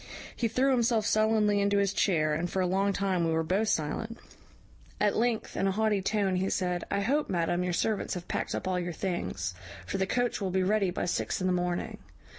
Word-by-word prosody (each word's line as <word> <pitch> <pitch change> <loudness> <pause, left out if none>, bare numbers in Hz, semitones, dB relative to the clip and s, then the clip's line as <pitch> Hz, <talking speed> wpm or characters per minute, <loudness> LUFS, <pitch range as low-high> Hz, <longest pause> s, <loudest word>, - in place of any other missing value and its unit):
He 235 - 0
threw 255 +5 +2
himself 235 -3 +2
sullenly 215 -2 +3
into 200 0 +2
his 200 -1 +2
chair, 155 -7 +2
and 170 +3 -1
for 190 - -2
a 185 - +2
long 195 +2 +1
time 190 -3 0
we 165 -1 +1
were 160 0 +1
both 195 +7 0
silent. 215 +8 -1 0.8
At 205 - +2
length, 230 -1 0
in 195 - +1
a - - +2
haughty 210 0 +1
tone, 195 -1 +1
he 190 +1 0
said, 180 -1 -1
`I 200 0 0
hope, 290 +7 +1
madam, 175 0 0
your 180 -1 -1
servants 210 +3 -1
have 175 -1 -7
packed - - -2
up - - -4
all 185 -1 0
your 175 -1 -3
things; 130 - -3 0.3
for 95 - -3
the 190 - +1
coach 245 0 0
will 195 - -1
be 190 +1 +1
ready 200 0 +2
by 175 - -2
six 175 - -1
in 185 - -2
the 185 - +2
morning.' 180 0 -2
195 Hz, 225 wpm, -29 LUFS, 180-215 Hz, 0.8 s, sullenly